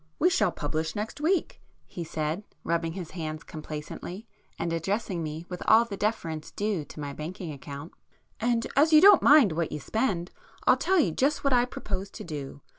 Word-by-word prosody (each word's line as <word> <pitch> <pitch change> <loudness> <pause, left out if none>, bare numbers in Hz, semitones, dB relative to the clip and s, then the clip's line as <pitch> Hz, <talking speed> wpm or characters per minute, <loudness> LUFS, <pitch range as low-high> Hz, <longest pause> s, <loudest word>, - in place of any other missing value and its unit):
"We 355 +3 +4
shall 210 - +3
publish 155 +1 -3
next 215 +7 -4
week,"—he 320 - -2
said, 160 +3 -3 0.2
rubbing 165 -1 -1
his 180 -3 -6
hands 155 -3 -5
complacently, 155 +6 -7 0.3
and 170 - -2
addressing 190 +2 -1
me 155 +1 -5
with 180 -1 -7
all 225 +2 +7
the 210 -4 -6
deference 170 -7 -2
due 205 -6 -2
to - - -11
my 145 -1 -4
banking 165 +3 -6
account—"And 160 - -5
as 300 +4 +5
you 305 - +10
don't 395 +1 +8
mind 280 - +7
what 165 0 -1
you 150 - -3
spend, 190 - -1 0.3
I'll - - +7
tell 380 - +1
you 195 - +3
just 275 - +1
what 275 -2 +2
I 245 -1 +4
propose 195 -5 -5
to - - -9
do. 145 -3 -7
180 Hz, 180 wpm, -28 LUFS, 155-230 Hz, 0.3 s, you